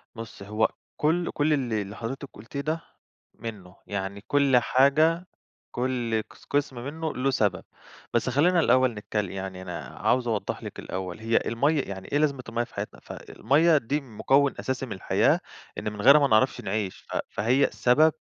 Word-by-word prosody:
بُصي 115 -3 -9
هو 105 +1 +2 0.3
كل 170 +3 +1
كل 150 +1 +2
اللي 120 -7 0
اللي 100 +1 -7
حضرتِك 130 +4 -5
قُلتيه 115 +7 -6
ده 160 +3 -2 0.5
منُه، 100 -6 -8
يعني 100 0 -4
كل 140 -3 +4
حاجة 155 +8 +3 0.5
كل 120 -3 -1
قس - - -18
قسم 140 -4 0
منُه 155 +5 -4
له 135 +1 0
سبب، 100 -7 +1 0.5
بس 120 +2 +1
خلّينا 170 +7 +3
الأول 130 -3 +4
نتكل 105 -2 -3
يعني 95 -1 -6
أنا 90 -3 -5 0.2
عاوز 125 -1 +2
أوضح 110 -3 -2
لِك - - -7
الأول، 95 +1 -5
هي 115 +1 +1
المَيّة 140 +6 +2
يعني 95 -1 -7
إيه 145 - +2
لازمة 140 -4 +1
المَيّة 120 +1 0
في - - -14
حياتنا، - - -5
ف - - -10
المَيّة 160 +3 +2
دي 140 +4 -1
مكون 135 +3 +2
أساسي 130 0 -2
من 115 - -11
الحياة، 95 - +2 0.4
إن 105 - -3
من 105 - -6
غيرها 140 +5 +8
ما 140 - +3
نعرفش 115 +2 +3
نعيش، 100 -1 -3
ف - - -2
فهي 125 +7 +2
سبب 155 +6 +4
125 Hz, 175 wpm, -26 LUFS, 105-140 Hz, 0.5 s, غيرها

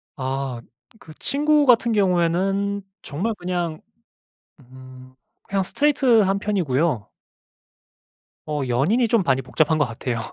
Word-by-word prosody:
아 130 -2 -4 0.4
그 155 - -14
친구 295 - +2
같은 235 -2 +4
경우에는 195 +1 +1 0.2
정말 195 +11 -3
그냥 175 -3 -3 0.8
음 130 0 -15 0.3
그냥 195 -1 -1
스트레이트 270 -1 +3
한 195 0 +1
편이고요. 160 - -1 1.4
어 150 -1 -3
연인이 175 - +2
좀 220 -4 +2
많이 135 -3 +1
복잡한 155 +4 +1
것 150 - +2
같아요. 115 0 -4
170 Hz, 240 characters per minute, -22 LUFS, 135-205 Hz, 1.4 s, 같은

